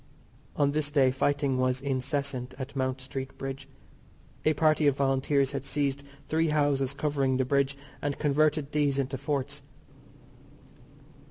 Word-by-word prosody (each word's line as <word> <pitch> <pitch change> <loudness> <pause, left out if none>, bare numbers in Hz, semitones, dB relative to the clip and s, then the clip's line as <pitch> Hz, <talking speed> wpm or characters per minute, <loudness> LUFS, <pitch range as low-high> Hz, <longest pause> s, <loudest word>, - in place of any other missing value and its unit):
On 140 -1 +2
this 150 0 0
day 135 -3 +4
fighting 140 0 +1
was 130 0 +1
incessant 135 -1 -2
at 135 +1 -6
Mount 130 -1 -1
Street 135 +1 -6
Bridge. 135 0 -5 0.8
A 155 - +5
party 155 0 +3
of 140 -1 +3
Volunteers 135 0 +2
had 140 -2 -3
seized 140 0 -1 0.3
three 160 +1 +2
houses 145 -3 +1
covering 140 -3 +1
the 130 - +1
bridge 140 +1 +1 0.2
and 145 -1 -2
converted 150 0 +2
these 145 -2 +1
into 135 -1 -1
forts. 140 -1 -2
140 Hz, 140 wpm, -28 LUFS, 135-145 Hz, 0.8 s, A